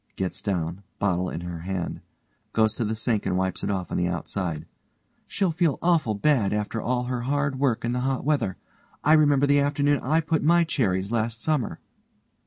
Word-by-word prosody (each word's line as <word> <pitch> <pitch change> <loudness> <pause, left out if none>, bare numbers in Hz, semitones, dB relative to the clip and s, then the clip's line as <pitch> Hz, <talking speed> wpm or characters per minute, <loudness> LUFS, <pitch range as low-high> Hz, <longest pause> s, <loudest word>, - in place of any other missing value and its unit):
(gets 95 -1 -3
down, 90 -2 -2 0.2
bottle 90 -2 0
in - - -5
her 85 -1 -6
hand. 90 +1 -4 0.5
Goes 110 -1 +2
to - - 0
the 110 +1 -1
sink 110 -1 -1
and 90 - +1
wipes 95 0 -1
it - - -1
off 95 -3 -2
on - - -1
the 90 - +1
outside) 85 -2 -3 0.6
She'll 195 -4 0
feel 160 -4 +1
awful 165 -11 +2
bad 115 -4 +2
after 105 +2 -2
all 125 0 0
her 125 -1 -2
hard 140 +1 -1
work 130 -5 +1
in 120 - 0
the 125 - -1
hot 130 0 -1
weather. 145 -11 0 0.5
I 155 - +5
remember 145 -3 +5
the 145 0 +4
afternoon 145 0 +2
I 155 +5 +1
put 160 0 +1
up - - -3
my 170 +2 +5
cherries 100 - 0
last 115 0 -1
summer. 145 -3 -1
120 Hz, 195 wpm, -25 LUFS, 95-145 Hz, 0.6 s, I